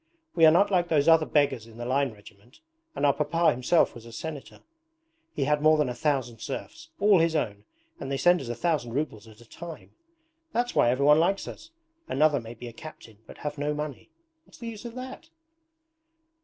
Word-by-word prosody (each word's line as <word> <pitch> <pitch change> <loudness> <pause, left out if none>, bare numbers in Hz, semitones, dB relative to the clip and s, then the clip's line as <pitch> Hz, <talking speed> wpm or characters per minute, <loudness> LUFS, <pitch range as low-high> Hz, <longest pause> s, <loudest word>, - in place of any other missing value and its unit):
'We 165 -2 +6
are - - +8
not 195 +5 +3
like 175 -2 +2
those 155 -3 +2
other 160 -1 +5
beggars 140 -6 +1
in 115 0 -15
the 120 - -6
line 135 +1 +1
regiment, 105 +3 -18 0.3
and - - 0
our 140 - +5
papa 160 +4 +2
himself 125 +7 +2
was 120 - -11
a - - -11
Senator. 145 +4 -8 0.7
He - - 0
had 150 +1 +1
more 155 0 +5
than 150 -4 +1
a - - -3
thousand 120 -3 -1
serfs, - - -7
all 200 -2 +5
his 165 0 +2
own, 105 -9 -2 0.3
and - - -6
they 135 - 0
send 175 +3 +4
us 125 - -7
a 120 - -3
thousand 150 -8 -1
rubles 120 -7 -3
at 110 +1 -16
a - - -15
time. 170 +2 -10 0.6
That's 245 +1 0
why 120 - +4
everyone 140 +4 +4
likes 195 +4 +1
us. 320 - -10 0.4
Another 150 +1 +2
may 115 0 -9
be 120 +2 -9
a 120 - -9
captain 115 -6 -12
but - - -12
have 150 0 -4
no 150 +1 -1
money. 150 -3 -6 0.4
What's - - -18
the 235 -1 -6
use 220 0 -9
of 235 0 -7
that?' 260 +6 -8
150 Hz, 210 wpm, -27 LUFS, 120-165 Hz, 0.7 s, are